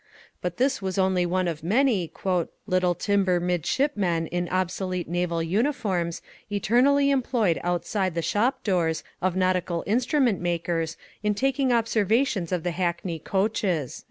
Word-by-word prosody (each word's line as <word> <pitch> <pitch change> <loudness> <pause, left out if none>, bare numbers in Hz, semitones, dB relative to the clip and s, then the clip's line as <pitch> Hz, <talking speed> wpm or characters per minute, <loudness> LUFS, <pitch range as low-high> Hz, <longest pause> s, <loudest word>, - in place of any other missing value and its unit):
But 180 -1 -3
this 260 -3 +1
was 190 0 -3
only 185 -2 +2
one 185 +1 0
of 165 -3 -3
many 210 - +2 0.5
"little 185 -3 +1
timber 190 -3 +1
midshipmen 180 - 0
in 175 0 -1
obsolete 185 0 -2
naval 170 -1 -1
uniforms, 190 - -1 0.3
eternally 260 +8 +3
employed 240 -9 +1
outside 175 +1 -1
the 170 - -1
shop 230 +10 0
doors 170 -5 0 0.2
of 185 -1 0
nautical 185 -2 0
instrument 245 - +1
makers 170 -1 -1 0.2
in 210 0 0
taking 270 +2 +1
observations 225 - +1
of 180 -3 -1
the 175 - -1
hackney 170 -1 -2
coaches." 190 - -1
185 Hz, 130 wpm, -25 LUFS, 175-220 Hz, 0.5 s, eternally